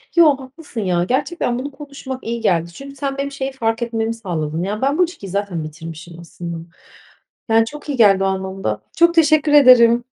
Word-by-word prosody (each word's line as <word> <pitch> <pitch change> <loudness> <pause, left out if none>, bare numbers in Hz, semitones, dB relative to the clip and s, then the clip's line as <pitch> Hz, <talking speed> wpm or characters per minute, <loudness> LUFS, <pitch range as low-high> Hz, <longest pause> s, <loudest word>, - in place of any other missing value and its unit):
Yo, 310 -5 +6
haklısın, 265 -2 -8
ya, 180 -3 +1
gerçekten 260 - -1
bunu 285 +3 -5
konuşmak 275 -2 -8
iyi 235 0 -4
geldi. 170 -5 0
Çünkü 275 +4 -10
sen 275 0 -3
benim 280 0 -3
şeyi 275 -1 -4
fark 225 -3 -2
etmemi 225 -1 -2
sağladın. 165 -7 -4
Ya, 210 +3 -3
ben 275 +3 +1
bu 365 - +5
ilişkiyi 335 - -5
zaten 195 -4 -3
bitirmişim 165 +2 -9
aslında. 170 0 -7 0.9
Yani, 225 0 +4
çok 295 +5 -10
iyi 280 - -2
geldi 195 -4 +5
o - - +2
anlamda. 190 - -3 0.2
Çok 340 +1 +5
teşekkür 310 -2 +3
ederim. 245 -4 +7
235 Hz, 185 wpm, -19 LUFS, 190-280 Hz, 0.9 s, ederim